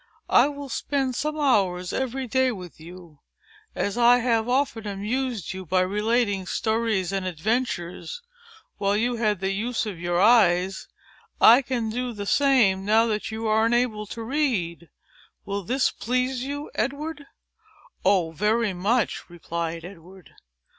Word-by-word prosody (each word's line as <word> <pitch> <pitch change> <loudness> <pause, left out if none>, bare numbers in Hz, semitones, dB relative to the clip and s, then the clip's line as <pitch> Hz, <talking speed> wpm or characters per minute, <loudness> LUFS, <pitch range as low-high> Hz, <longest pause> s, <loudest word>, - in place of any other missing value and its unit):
"I 245 - +6
will 285 -1 -6
spend 270 0 -1
some 305 +4 -3
hours 190 -10 +1
of - - 0
every 260 +1 -3
day 260 +2 +1
with 180 -8 -9
you. 170 -2 -13 0.6
And - - 0
as 205 +4 -3
I 240 +1 +6
have 230 -1 0
often 245 -4 0
amused 215 +2 -3
you 190 0 -7
by 185 +2 +1
relating 205 0 0
stories 220 -5 0
and 195 -1 -2
adventures, 215 - -3 0.6
while 200 +1 +1
you 240 +2 0
had 210 -4 0
the 190 0 0
use 225 +4 -2
of 200 -6 -6
your 175 0 -1
eyes, 190 -4 +3 0.5
I 240 +4 +8
can 240 -4 -2
do 245 +1 -3
the 205 -2 -6
same, 230 -7 +3
now 220 +3 +4
that 215 -2 -2
you 220 +1 -5
are 220 +1 +3
unable 230 -3 0
to 230 +2 -7
read. 215 - -1 0.6
Will 200 0 -3
this 255 +7 +1
please 250 +2 -1
you, 285 +2 -5
Edward?" 290 +5 -3 0.8
"Oh, 180 -5 +2
very 210 +4 +1
much!" 205 +3 -1
replied 170 -1 -5
Edward. 185 0 -13
220 Hz, 150 wpm, -25 LUFS, 190-250 Hz, 0.8 s, I